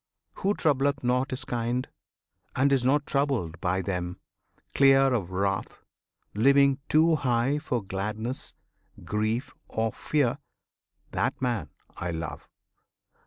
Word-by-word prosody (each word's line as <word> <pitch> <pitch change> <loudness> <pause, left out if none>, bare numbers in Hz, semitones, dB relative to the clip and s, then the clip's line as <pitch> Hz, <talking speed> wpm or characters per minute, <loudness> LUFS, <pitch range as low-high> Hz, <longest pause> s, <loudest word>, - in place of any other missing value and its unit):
Who 200 +2 +1
troubleth 140 -2 +1
not 125 +2 +1
his 130 +1 -4
kind, 120 +1 -1 0.7
And 140 +2 +3
is 130 -3 +2
not 145 +3 +2
troubled 130 - -1
by 95 0 0
them; 90 -1 -3 0.6
clear 135 -1 +5
of 100 -8 -1
wrath, 95 +1 -2 0.5
Living 140 +4 +4
too 160 +1 +4
high 130 +2 +1
for 125 -7 -2
gladness, 105 +6 -4 0.5
grief, 110 +4 -1
or 110 0 -1
fear, 145 -6 0 0.7
That - - -1
man 115 - -1 0.3
I 85 - -3
love! 80 -2 -5
125 Hz, 120 wpm, -27 LUFS, 100-140 Hz, 0.7 s, clear